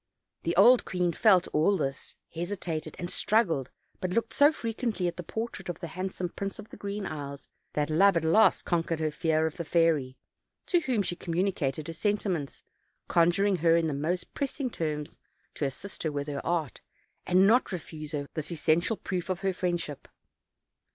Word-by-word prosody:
The 170 - -1
old 235 +6 +7
queen 180 -2 0
felt 190 -3 +4
all 180 +6 +3
this, 135 -4 -3 0.2
hesitated, 165 -3 -4
and 175 - -4
struggled, 175 - +1 0.3
but 185 - -2
looked 230 +5 -1
so 290 +1 +6
frequently 230 - -2
at 175 - -3
the 180 - -5
portrait 220 0 -5
of 175 - -4
the 170 -2 -6
handsome 185 +1 -4
Prince 195 +3 -5
of 215 0 -10
the - - -10
Green 200 0 -4
Isles 140 -3 -6 0.2
that 150 +1 0
love 190 +3 +5
at 165 - 0
last 190 +8 +4
conquered 165 -2 0
her 155 -1 0
fear 160 +1 +1
of 160 +1 -3
the 170 - -3
fairy, 155 -6 +2 0.5
to 350 - +3
whom 255 -10 0
she 175 - -2
communicated 165 -5 -1
her 165 - -5
senti 205 +4 0
ments, 150 -7 -3 0.5
conjuring 180 +4 +3
her 165 0 +4
in 170 -1 +2
the 155 - -1
most 160 +6 -2
pressing 275 -2 -2
terms 150 -4 -4 0.3
to 150 - -2
assist 185 +9 -6
her 160 - -1
with 145 -1 -3
her 145 -1 -4
art, 165 -7 -2 0.5
and 185 +2 +5
not 235 +5 +4
to 190 - -3
refuse 155 -2 -8
her 145 -1 -2
this 155 +1 -3
essential 170 +6 +1
proof 180 -1 -4
of 185 0 -2
her 195 -1 0
friendship. 175 -6 -3
175 Hz, 185 wpm, -28 LUFS, 155-195 Hz, 0.5 s, old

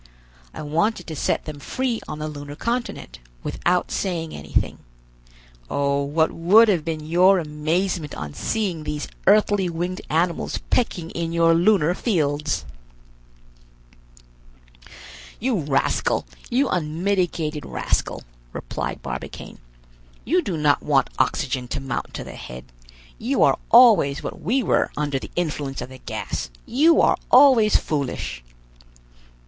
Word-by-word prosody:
I - - -8
wanted 170 +6 0
to 160 - -6
set - - -1
them 150 -2 -7
free 245 - -2
on 155 - -5
the 155 0 -4
lunar 145 -1 -7
continent, 235 - -4 0.2
without 180 0 0
saying 170 -4 -2
anything. 70 0 -2 0.9
Oh, 140 0 +1
what 155 +3 +1
would 210 +7 +5
have 175 -6 +2
been 155 -1 -4
your 180 +4 +5
amazement 160 +1 -2
on 75 -1 -6
seeing 185 - -2
these 150 -1 -4 0.2
earthly 205 -2 +4
winged 175 +2 -3
animals 170 +2 0
pecking 175 -9 0
in 165 -1 -3
your 165 0 +4
lunar 175 -1 +3
fields!" 150 - -1 2.7
"You 240 -4 0
rascal, 140 -3 0 0.2
you 265 +3 +2
unmitigated 170 - -1
rascal," - - -2 0.3
replied - - -5
Barbicane, - - -7 0.7
"you 360 +2 +2
do 185 - -3
not 150 -1 +2
want 140 -3 +2
oxygen 130 -1 0
to - - -3
mount 135 -3 -4
to - - -4
the - - -9
head. 60 +1 -9 0.5
You 255 +4 +1
are - - +3
always 220 - +6
what - - -6
we 245 - +1
were - - +2
under 145 -2 -1
the - - -9
influence 150 -5 -2
of - - -5
the 130 0 -12
gas; - - -5 0.2
you 315 +7 +4
are - - +4
always 250 -5 +6
foolish!" 135 - -2
165 Hz, 130 wpm, -23 LUFS, 145-200 Hz, 2.7 s, always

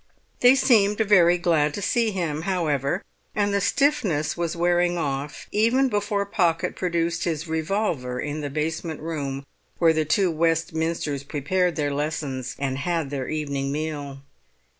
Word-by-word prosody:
They 250 +2 +7
seemed 210 -6 +4
very 185 -5 +5
glad 160 -4 +1
to - - -4
see 230 +2 +2
him, 170 -6 -2
however, 165 -3 -1 0.3
and 205 -1 +1
the 200 - +1
stiffness 210 - +1
was 170 -1 -2
wearing 175 +1 +2
off 145 -2 -3
even 240 +6 +3
before 205 -2 0
Pocket 175 -5 0
produced 170 -2 -1
his 160 -1 -2
revolver 160 -6 -1
in 150 +2 -3
the 145 - -3
basement 160 +2 -3
room 140 -4 -4 0.3
where 165 -2 +4
the 155 0 +1
two 175 +4 +2
Westminsters 160 -2 0
prepared 175 +5 0
their 145 -2 -1
lessons 140 -3 -3
and 135 -1 -2
had 165 -1 -1
their 135 -3 -3
evening 140 -3 -2
meal. 145 -2 -4
165 Hz, 145 wpm, -24 LUFS, 145-185 Hz, 0.3 s, They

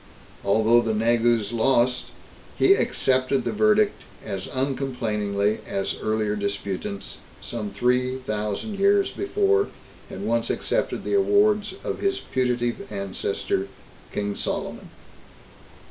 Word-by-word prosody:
Although 110 +4 +4
the 115 -2 -1
Negus 115 -1 +2
lost, 125 +1 +2 0.5
he 390 - +6
accepted 130 - +1
the - - 0
verdict 215 -1 +3 0.2
as 95 -3 -4
uncomplainingly 115 -7 -1
as 95 - -1
earlier 110 -1 0
disputants, 100 -1 -3 0.2
some 110 -3 -4
three 125 +5 +1
thousand 110 - -3
years 200 0 +4
before, 405 +1 +1 0.4
had - - -7
once - - 0
accepted - - -1
the - - -2
awards 405 +1 +3
of - - -3
his 395 -1 0
putative 125 -3 -1
ancestor, 100 -1 -2 0.4
King 100 0 -2
Solomon. - - -4
120 Hz, 110 wpm, -24 LUFS, 105-140 Hz, 0.5 s, he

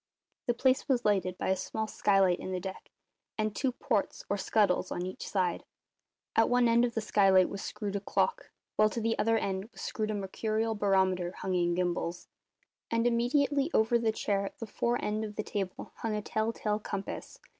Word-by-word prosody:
The 240 - +2
place 260 +3 +2
was 250 -2 +2
lighted 190 -3 +1
by - - -2
a 190 - +3
small 220 +4 -3
skylight 195 -4 +3
in 185 - -5
the 185 - -1
deck, 190 +1 -7 0.5
and 215 -1 -1
two 265 +3 +1
ports, 215 -4 -1
or - - +3
scuttles, 190 -2 +1
on 175 - -2
each 185 - -6
side. 180 -4 0 0.7
At - - +4
one 245 -1 +4
end 235 +1 +4
of 240 -1 0
the 225 - 0
skylight 195 -3 +4
was 200 - -5
screwed 205 -2 -4
a - - +1
clock, 330 - 0 0.3
while 215 0 +5
to 230 - -3
the 225 0 +1
other 225 +1 +3
end 190 -2 -2
was - - -11
screwed 215 -1 -2
a 215 - -1
mercurial 215 +3 -1
barometer 190 -3 +1
hung 190 - -3
in 175 -1 +2
gimbals; 175 -1 -2 0.6
and 230 0 +1
immediately 275 +5 +2
over 230 +2 +4
the 225 -1 +2
chair 200 -2 0
at - - -11
the 225 - -5
fore 235 +2 -1
end 215 +1 -1
of 210 -1 -6
the 215 - -2
table 195 -3 -4
hung 225 -2 -2
a 210 - -3
tell 220 +2 0
tale 210 -2 -1
compass. 205 - -6
210 Hz, 200 wpm, -30 LUFS, 190-230 Hz, 0.7 s, while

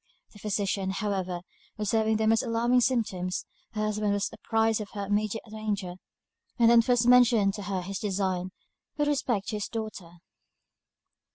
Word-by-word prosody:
The 205 - -14
physician, 200 -2 -1
however, 190 -3 -2 0.4
observing 220 +1 +1
the 220 - 0
most 225 +1 +4
alarming 240 +1 +2
symptoms; 205 -8 -1 0.3
her 215 - -2
husband 210 -1 0
was 205 0 -1
apprised 225 -1 +1
of 205 - -7
her 200 -1 -3
immediate 210 +2 -1
danger; 205 -4 -3 0.6
and 235 -1 +5
then 235 -1 +7
first 245 0 +2
mentioned 235 -5 +5
to 210 - -6
her 190 -2 -3
his 195 +2 -4
designs 190 -3 -1 0.5
with 295 0 +1
respect 245 -8 0
to 215 - -2
his 210 - -3
daughter. 215 -6 -6
210 Hz, 155 wpm, -28 LUFS, 195-225 Hz, 0.6 s, then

